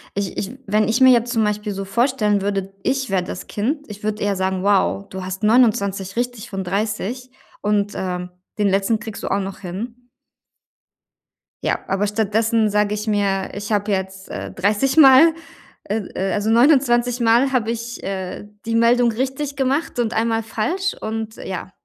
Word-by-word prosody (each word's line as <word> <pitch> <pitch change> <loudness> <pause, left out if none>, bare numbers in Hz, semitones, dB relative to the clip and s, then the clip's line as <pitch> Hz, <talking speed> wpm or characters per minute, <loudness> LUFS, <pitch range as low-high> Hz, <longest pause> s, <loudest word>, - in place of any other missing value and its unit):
Ich 200 -2 -2
ich 215 +6 -4
wenn 215 +2 +2
ich 225 +3 +2
mir 260 -1 +8
jetzt 240 0 +1
zum 225 -3 +2
Beispiel 210 0 -2
so 195 0 -4
vorstellen 215 -1 +1
würde, 195 -1 -2
ich 265 -1 0
wäre 190 -2 +1
das 180 - -7
Kind. 280 +8 -2
Ich 210 0 -10
würde 210 0 -2
eher 205 -1 +1
sagen: 190 0 -1
„Wow, 200 0 +2
du 190 -1 -6
hast 190 +1 -5
29 205 -4 +2
richtig 245 -2 -3
von 195 -2 -4
30 215 +6 -3 0.3
und, 205 -1 0
ähm, 180 -1 -4 0.3
den 205 -1 +2
letzten 195 +3 +1
kriegst 220 -2 -8
du - - -2
auch 200 - +2
noch 195 -1 -5
hin.“ 230 +7 -7 1.6
Ja, - - 0
aber 195 +2 0
stattdessen 220 +1 +1
sage 210 0 +1
ich 210 +1 -4
mir: 200 -2 0
„Ich 205 +2 -6
habe 205 0 +1
jetzt, 190 0 -3
äh, - - -5
30 210 +10 0
Mal, 305 +2 +8 0.5
äh 210 - -2 0.2
äh, 190 +1 -1
also, 210 +1 0
29 245 -1 +4
Mal 235 +3 +3
habe 240 -4 0
ich, 235 +1 -5
äh, 190 0 -4 0.2
die 230 - -2
Meldung 235 +1 +4
richtig 265 +4 -3
gemacht 270 +1 -1
und 235 -1 0
einmal 225 0 +1
falsch.“ 285 - -2
Und 220 0 -4
ja, 185 0 -6
215 Hz, 175 wpm, -21 LUFS, 195-240 Hz, 1.6 s, mir